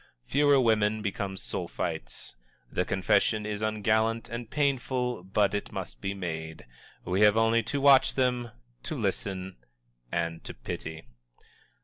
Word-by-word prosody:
Fewer 145 - +4
women 110 -3 +2
become 100 -1 -2
Sulphites. 80 -8 -4 0.4
The 90 - 0
confession 105 +2 +2
is 105 0 -3
ungallant 110 +1 +1
and 120 -1 -5
painful, 130 -6 0
but 100 +2 +1
it 105 - -3
must - - -6
be 100 0 -2
made. 80 -4 -5 0.4
We 95 +3 0
have 105 0 +6
only 115 +1 +4
to 140 +5 -2
watch 135 -1 +6
them, 125 -2 +1 0.3
to - - -4
listen 95 -1 -2 0.5
and 85 -1 -2
to - - -7
pity. 80 +6 -6
105 Hz, 130 wpm, -28 LUFS, 95-120 Hz, 0.5 s, have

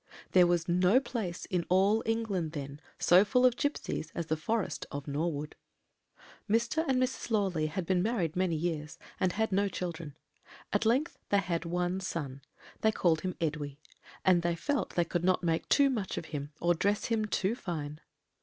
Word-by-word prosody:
"There 180 -1 +6
was 175 -1 +1
no 180 +7 +4
place 215 -10 -4
in 180 -2 -1
all 195 +4 +4
England 205 -8 -1
then 140 -1 -6 0.2
so 180 +3 +6
full 250 +5 +3
of 250 -2 +5
gipsies 285 - -2
as 170 - -2
the 160 - 0
forest 190 +1 -2
of 140 +1 -6
Norwood. 150 0 -2 0.9
"Mr. 235 +9 +2
and 260 -1 +2
Mrs. 255 -1 -1
Lawley 190 -8 +1
had 180 +3 -3
been 180 0 +2
married 190 -6 0
many 180 -2 +1
years, 155 -2 -3 0.2
and 185 -2 +1
had 220 0 0
no 200 +2 +2
children; 170 -6 -5 0.6
at - - +2
length 270 +9 +1
they 200 - +4
had 175 -3 -1
one 175 +2 -1
son 145 -8 -4 0.4
they 220 - +3
called 165 -6 +2
him 185 -1 -3
Edwy, 150 -3 -3 0.5
and 180 -2 +5
they 170 0 0
felt 285 - -2
they 175 - +3
could 175 +1 -2
not 185 0 +2
make 165 -1 0
too 280 -1 +5
much 210 -7 -3
of - - -4
him, 145 0 -4
or 175 0 +3
dress 200 +5 0
him 225 -2 0
too 205 0 0
fine. 155 -9 -5
180 Hz, 180 wpm, -31 LUFS, 160-215 Hz, 0.9 s, There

